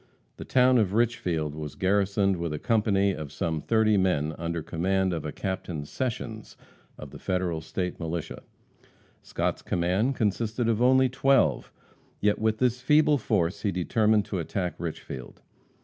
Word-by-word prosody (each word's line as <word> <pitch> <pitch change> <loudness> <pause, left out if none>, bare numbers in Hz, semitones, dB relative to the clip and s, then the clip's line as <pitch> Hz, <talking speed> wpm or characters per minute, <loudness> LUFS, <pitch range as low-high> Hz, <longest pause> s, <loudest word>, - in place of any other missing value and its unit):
The - - -8
town 125 -1 +4
of 100 -3 +1
Richfield 90 -10 0
was 75 -1 -7
garrisoned 100 0 +1
by 85 - -2
a 75 -1 -3
company 100 -1 +2
of 75 -4 -7
some 80 -2 -2
thirty 110 0 +3
men 80 -5 +1
under 85 -1 -3
command 95 +3 0
of 80 -3 -4
a 75 - -3
Captain 90 -6 -4
Sessions, 110 - -5 0.4
of - - -10
the - - -10
Federal 90 -3 -1
State 90 +3 -4
militia. 80 -1 -4 0.8
Scott's - - -2
command 95 +9 0
consisted 110 +2 -1
of 115 0 +1
only 130 +1 +5
twelve. 135 +1 +2 0.5
Yet 105 0 +1
with 110 0 +1
this 125 +1 +1
feeble 150 +1 +4
force 95 -6 0
he 100 - 0
determined 105 +4 +2
to 95 - -3
attack 90 +2 -2
Richfield. 70 -6 -7
95 Hz, 150 wpm, -27 LUFS, 85-110 Hz, 0.8 s, only